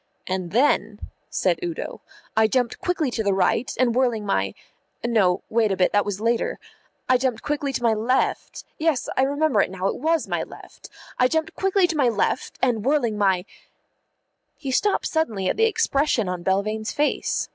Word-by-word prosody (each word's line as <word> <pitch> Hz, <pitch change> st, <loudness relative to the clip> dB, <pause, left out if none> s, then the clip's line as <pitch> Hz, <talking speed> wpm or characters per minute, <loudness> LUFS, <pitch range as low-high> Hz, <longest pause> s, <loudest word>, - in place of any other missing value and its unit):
"And 185 Hz, -2 st, -3 dB
then," 255 Hz, +10 st, +1 dB, 0.2 s
said -, -, 0 dB
Udo, 345 Hz, -2 st, -5 dB, 0.3 s
"I 220 Hz, 0 st, +5 dB
jumped 245 Hz, +1 st, 0 dB
quickly 330 Hz, -7 st, 0 dB
to 230 Hz, -, -2 dB
the 200 Hz, -2 st, +1 dB
right, 195 Hz, +5 st, +1 dB
and 250 Hz, -2 st, +3 dB
whirling 240 Hz, -4 st, +1 dB
my 95 Hz, -, 0 dB, 0.5 s
no, 205 Hz, -7 st, +2 dB
wait 220 Hz, -2 st, +1 dB
a 190 Hz, -, -1 dB
bit, 180 Hz, -, +3 dB
that 205 Hz, 0 st, +2 dB
was 205 Hz, -1 st, -3 dB
later 230 Hz, +1 st, 0 dB, 0.5 s
I 255 Hz, -, +5 dB
jumped 255 Hz, -3 st, -1 dB
quickly 290 Hz, -1 st, -1 dB
to 250 Hz, -, -3 dB
my 230 Hz, -1 st, +4 dB
left 230 Hz, +5 st, -1 dB, 0.2 s
yes, 315 Hz, -5 st, +1 dB
I -, -, +2 dB
remember 285 Hz, -4 st, +2 dB
it -, -, 0 dB
now, 190 Hz, 0 st, -5 dB
it -, -, -3 dB
was 320 Hz, +4 st, 0 dB
my -, -, -1 dB
left -, -, -11 dB, 0.3 s
I 250 Hz, -, +5 dB
jumped 320 Hz, +3 st, -1 dB
quickly 385 Hz, -1 st, +2 dB
to 345 Hz, -, -2 dB
my 275 Hz, -5 st, +3 dB
left, 225 Hz, +3 st, -1 dB
and 235 Hz, -5 st, +1 dB
whirling 255 Hz, -5 st, +1 dB
my 190 Hz, -3 st, +1 dB, 0.6 s
" -, -, -51 dB
He 270 Hz, -, -2 dB
stopped 410 Hz, +10 st, +1 dB
suddenly 225 Hz, -13 st, -1 dB
at -, -, +1 dB
the 450 Hz, -, +4 dB
expression 300 Hz, -, +1 dB
on 180 Hz, -1 st, -3 dB
Belvane's 210 Hz, +4 st, -1 dB
face. 295 Hz, +1 st, 0 dB
240 Hz, 185 wpm, -23 LUFS, 205-290 Hz, 0.6 s, I